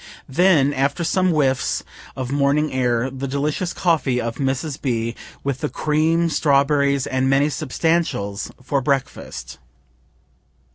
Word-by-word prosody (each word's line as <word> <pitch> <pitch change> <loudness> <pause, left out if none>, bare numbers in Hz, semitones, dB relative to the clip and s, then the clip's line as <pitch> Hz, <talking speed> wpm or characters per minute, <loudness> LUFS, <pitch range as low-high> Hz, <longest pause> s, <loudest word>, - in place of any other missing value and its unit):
Then, 145 -2 +3
after 140 +5 0
some 185 +2 +2
whiffs 135 -6 +1 0.3
of 130 -1 -4
morning 145 +2 +1
air, 125 0 +1
the 135 +1 -4
delicious 150 +6 -1
coffee 155 -8 +1
of 115 0 -3
Mrs. 135 +2 -2
B., 115 -3 -1 0.3
with 140 -2 -2
the 150 - -2
cream, 160 +2 +1
strawberries, 140 -3 +2
and 130 0 0
many 140 +2 +3
substantials, 150 -8 -1
for 135 +2 0
breakfast. 125 - -3
140 Hz, 125 wpm, -21 LUFS, 130-155 Hz, 0.3 s, Then